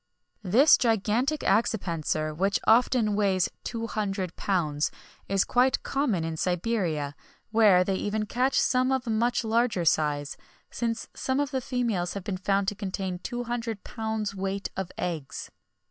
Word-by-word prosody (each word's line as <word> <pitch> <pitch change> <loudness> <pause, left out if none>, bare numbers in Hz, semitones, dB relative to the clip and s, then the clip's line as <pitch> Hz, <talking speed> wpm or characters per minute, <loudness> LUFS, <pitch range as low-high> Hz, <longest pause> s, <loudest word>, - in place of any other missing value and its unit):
[XXI - - -42
38] - - -4
This 270 +9 +7
gigantic 235 +5 +1
accipenser, 170 - 0
which 195 +5 +1
often 230 -2 +4
weighs 195 -3 +1
two 230 -1 -4
hundred 195 -5 -3
pounds, 155 -7 0 0.4
is 195 -1 +3
quite 250 +1 +2
common 260 - 0
in 160 -1 -3
Siberia, 175 -6 -1 0.4
where 210 -5 +5
they 190 0 -1
even 215 +2 -1
catch 250 +5 +1
some 255 0 +2
of 260 -2 0
a 230 - -2
much 235 +3 +1
larger 225 -5 +1
size, 145 -2 +1 0.3
since 230 -1 -2
some 260 +1 -1
of 285 -2 -1
the 265 - -1
females 235 -9 -1
have 200 - -4
been 190 -1 -3
found 195 +1 0
to - - -6
contain 190 -2 -4
two 240 +6 -4
hundred 230 -3 -4
pounds 220 -2 -3
weight 195 +1 -3
of 190 -2 -4
eggs. 165 -6 -4
205 Hz, 160 wpm, -27 LUFS, 185-235 Hz, 0.4 s, This